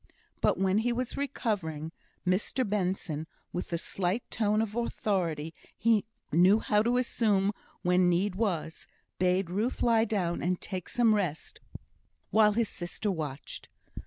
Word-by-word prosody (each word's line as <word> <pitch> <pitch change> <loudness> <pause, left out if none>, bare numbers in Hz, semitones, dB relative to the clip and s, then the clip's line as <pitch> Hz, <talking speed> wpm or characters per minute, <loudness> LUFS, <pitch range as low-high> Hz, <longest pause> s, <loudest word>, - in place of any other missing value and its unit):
But - - +3
when 190 +2 +2
he 240 +2 +1
was 245 +1 -2
recovering, 190 - -2 0.3
Mr 210 +7 0
Benson, 180 -6 -2 0.3
with 180 - -3
the 170 - -1
slight 190 +6 -1
tone 210 -1 +1
of 220 -1 -1
authority 175 -9 -1 0.2
he 225 -2 +3 0.3
knew 180 +6 +6
how 210 -1 +2
to 240 +3 +2
assume 210 -5 +2 0.3
when 180 0 +4
need 180 +3 +1
was, 180 -6 -2 0.3
bade 180 0 +2
Ruth 215 +7 -1
lie 230 -1 +4
down 185 -6 -1
and 180 0 0
take 185 -3 -5
some 235 -3 +4
rest, 180 -7 -2 0.7
while 215 -1 +5
his 230 +1 +1
sister 195 +3 -3
watched. 150 -6 -6
195 Hz, 140 wpm, -29 LUFS, 175-220 Hz, 0.7 s, knew